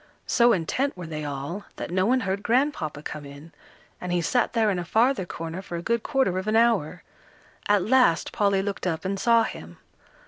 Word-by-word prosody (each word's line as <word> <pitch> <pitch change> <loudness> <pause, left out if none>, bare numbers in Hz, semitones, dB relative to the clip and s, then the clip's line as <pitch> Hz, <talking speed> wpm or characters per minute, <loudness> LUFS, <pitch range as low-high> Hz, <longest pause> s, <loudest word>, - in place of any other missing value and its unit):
So 240 -1 +4
intent 230 - -1
were 180 - -6
they 155 -1 -5
all, 145 +7 -5
that - - -6
no 185 +2 +1
one 255 +2 +2
heard 195 -1 -2
Grandpapa 230 - 0
come 150 - -6
in, 140 +3 -12 0.5
and 180 - -4
he 175 - +1
sat 235 +8 0
there 220 -3 +2
in 185 - -1
a - - -3
farther 220 +2 +1
corner, 165 +2 -6
for 185 -3 -7
a 170 - -5
good 235 +2 0
quarter 265 -11 0
of 190 - -6
an 215 - +1
hour. 220 -8 +2 0.6
At 205 -2 +3
last 245 -9 +3
Polly 200 -2 +1
looked 200 -2 -3
up 165 0 -2
and 195 +1 -2
saw 230 0 +4
him. 85 - -7
190 Hz, 205 wpm, -25 LUFS, 165-230 Hz, 0.6 s, So